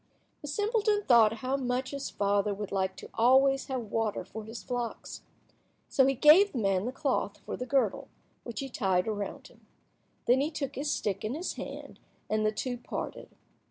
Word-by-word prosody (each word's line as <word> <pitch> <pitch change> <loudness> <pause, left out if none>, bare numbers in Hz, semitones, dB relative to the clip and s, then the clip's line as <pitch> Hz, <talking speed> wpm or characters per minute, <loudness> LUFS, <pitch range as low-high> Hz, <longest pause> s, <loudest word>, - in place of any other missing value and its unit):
The 295 - -7
simpleton 415 - +1
thought 230 - +6
how 265 +1 +1
much 255 -1 -2
his 280 -1 -4
father 200 0 +1
would 205 0 -6
like 190 -1 -1
to - - -10
always 270 +3 +4
have 250 -5 -4
water 225 -2 -1
for 220 0 -8
his 225 +2 -8
flocks. 245 -2 -4 0.7
So 265 -1 +4
he 270 - +2
gave 320 +10 +7
the - - -3
man 195 -3 +1
the 250 - -2
cloth 260 -7 -1
for - - -4
the 250 - -5
girdle, 270 -1 +1 0.4
which 235 -1 -5
he 275 - -4
tied 190 -6 +1
around 205 -2 -4
him. - - -23 0.6
Then 255 +2 +4
he 295 - 0
took 295 -4 -4
his 290 +2 -2
stick 200 -1 -2
in 220 +5 -2
his 345 +4 -3
hand, - - -8 0.3
and 215 0 +2
the 215 - +2
two 245 +3 -3
parted. - - -6
245 Hz, 190 wpm, -29 LUFS, 210-275 Hz, 0.7 s, gave